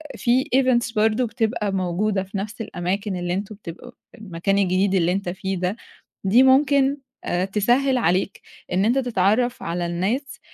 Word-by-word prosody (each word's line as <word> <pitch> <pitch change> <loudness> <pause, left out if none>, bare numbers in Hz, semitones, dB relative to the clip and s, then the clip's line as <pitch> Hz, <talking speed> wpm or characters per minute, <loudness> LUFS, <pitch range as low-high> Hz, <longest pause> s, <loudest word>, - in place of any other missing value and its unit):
في 245 +3 +2
events 245 -3 +2
برضه 220 +3 +2
بتبقى 220 -2 -1
موجودة 190 +2 -1
في 195 +1 -7
نَفْس 215 +3 -5
الأماكن 190 +1 -3
اللي 175 0 -2
أنتم 200 +2 -4
بتبقوا 200 +5 -10 0.2
المكان 195 -2 -2
الجديد 190 0 +2
اللي 175 -1 +2
أنت 195 -1 -2
فيه 190 +1 -3
ده، 185 +3 -1 0.5
دي 225 +7 +5
ممكن 275 +1 +4 0.3
آآ 180 +1 -1
تسهِّل 245 +7 +2
عليك 185 -2 0 0.3
إن 190 +3 +2
أنت 245 +4 +2
تتعرّف 240 0 +1
على 170 +1 -2
الناس 200 +12 -2
205 Hz, 155 wpm, -22 LUFS, 185-240 Hz, 0.5 s, دي